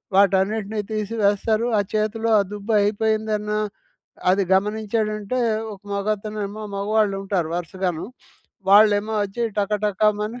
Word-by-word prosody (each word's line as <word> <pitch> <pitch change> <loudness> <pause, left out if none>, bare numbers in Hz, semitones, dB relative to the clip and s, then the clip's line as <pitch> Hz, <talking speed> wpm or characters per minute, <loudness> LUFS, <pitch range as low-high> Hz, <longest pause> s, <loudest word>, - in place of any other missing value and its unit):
వాటన్నిటిని 200 +2 +2
తీసి 215 +1 -2
వేస్తారు. 215 +3 +2
ఆ - - +4 0.2
చేతిలో 220 +2 0
ఆ - - +5
దుబ్బు 210 +2 -3
అయిపోయిందన్న 215 0 0 0.8
అది 195 +1 +3
గమనించాడంటే, 215 +3 -1 0.3
ఒక 190 - -16
మగతనేమో 210 +1 -3
మగవాళ్ళుంటారు 195 -4 0
వరుసగాను. 175 -1 -3 0.7
వాళ్ళేమో 210 +1 +5
అచ్చి 200 +4 -4 0.2
టకటకమని 210 +2 0
210 Hz, 100 wpm, -22 LUFS, 200-215 Hz, 0.8 s, ఆ